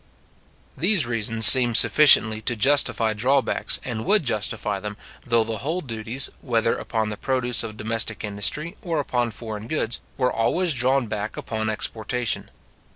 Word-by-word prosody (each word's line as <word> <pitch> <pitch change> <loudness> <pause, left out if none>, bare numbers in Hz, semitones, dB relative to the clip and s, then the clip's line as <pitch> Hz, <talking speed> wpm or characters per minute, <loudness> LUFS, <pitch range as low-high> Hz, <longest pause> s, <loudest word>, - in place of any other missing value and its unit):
These 175 - +1
reasons 115 -1 +1
seem 120 -2 +9
sufficiently 110 -6 +6
to 120 - -1
justify 115 -2 +1
drawbacks, 130 +5 0
and 115 -3 -5
would 210 - +2
justify 105 -3 -2
them, 105 +1 -8 0.3
though 115 -2 +2
the 110 0 -5
whole 160 +9 -4
duties, 115 0 -2
whether 115 -3 -1
upon 110 -1 -4
the 105 - -7
produce 125 -1 -1
of 110 -2 -8
domestic 110 0 -3
industry 105 +11 -3
or 170 -7 -3
upon 125 -4 -2
foreign 110 -1 -9
goods, 120 -5 -3 0.2
were 125 -1 -1
always 165 +10 0
drawn 130 +1 0
back 105 -1 -6
upon 110 -1 -5
exportation. 115 +1 -3
115 Hz, 150 wpm, -22 LUFS, 110-130 Hz, 0.3 s, seem